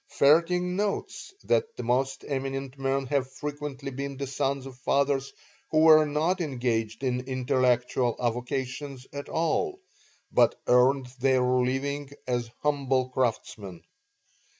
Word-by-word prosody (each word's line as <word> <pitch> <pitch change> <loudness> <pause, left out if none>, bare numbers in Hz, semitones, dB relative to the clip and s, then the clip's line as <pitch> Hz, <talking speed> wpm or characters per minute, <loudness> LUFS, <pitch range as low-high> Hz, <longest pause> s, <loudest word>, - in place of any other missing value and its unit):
Vaerting 180 +5 +4
notes 205 - -3
that 460 0 +1
the - - -4
most 135 +2 0
eminent 135 -1 -3
men 135 0 -1
have 135 -1 -1
frequently 145 -1 -5
been 140 +1 -5
the 140 - -3
sons 135 0 -2
of 135 -2 -9
fathers 140 0 +1 0.4
who 155 - +3
were 155 -1 +8
not 160 +6 0
engaged 120 -5 -2
in 125 -1 0
intellectual 125 -2 +1
avocations 130 +2 -3
at 140 0 -6
all, 370 - 0 0.5
but - - +3
earned 130 +2 +4
their 130 0 +3
living 135 +3 0 0.2
as 120 -2 -1
humble 135 -3 +1
craftsmen. 110 -7 -3
135 Hz, 125 wpm, -27 LUFS, 125-145 Hz, 0.5 s, were